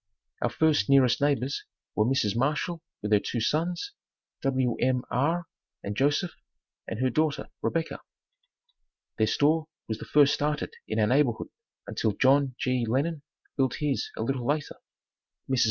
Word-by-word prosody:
Our 120 - +2
first 155 +4 +2
nearest 135 -1 +5
neighbors 140 -2 +1 0.3
were 105 - +2
Mrs. 115 -6 +1
Marshall 150 +6 0 0.2
with 105 - -2
her 105 - +6
two 120 - -3
sons, 170 - -1 0.5
Wm. 130 -1 +1
R. 165 +7 +1 0.4
and 100 +1 -4
Joseph, 145 - +1 0.5
and 115 - -4
her 130 0 +2
daughter, 155 +1 0
Rebecca. 165 -1 -1 1.2
Their 110 - +4
store 155 +6 +2 0.2
was 110 0 -3
the - - -7
first 145 -1 +5
started 150 0 -1
in 110 - -2
our 110 - +4
neighborhood 125 0 +2 0.4
until 110 +1 -1
John 135 +2 +3
G. 125 -1 +1
Lennon 140 +7 0 0.4
built 130 -2 +2
his 145 -3 -1
a - - -1
little 125 0 -2
later. 145 0 -1 0.7
Mrs. 130 -2 +1
135 Hz, 145 wpm, -28 LUFS, 120-150 Hz, 1.2 s, her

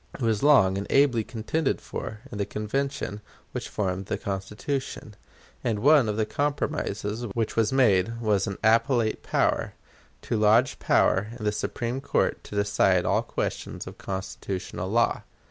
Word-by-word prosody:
It - - -10
was 110 -3 +1
long 100 -10 +5
and 100 - -5
ably 135 -5 +4
contended 125 +8 -1
for 105 -1 -6
in 105 - -6
the 100 - +1
Convention 110 0 -3 0.3
which - - -5
formed 95 -1 -2
the - - -1
Constitution; 105 +4 -4 0.5
and 115 -3 0
one 135 +1 +5
of 105 - -2
the 110 - +2
compromises 120 -6 -2
which 115 -2 -1
was 115 -2 +2
made 115 -4 +3
was 105 -4 +1
an 100 - -4
appellate 115 0 +3
power - - 0 0.5
to 115 - -1
lodge 110 +4 +4
power 95 +3 +3
in 110 - -6
the 105 - +2
Supreme 120 +4 -3
Court 140 - 0
to - - -8
decide 100 -3 +2
all - - +2
questions - - -4
of - - -10
constitutional 95 -1 -5
law. 115 +3 +2
110 Hz, 155 wpm, -26 LUFS, 100-125 Hz, 0.5 s, long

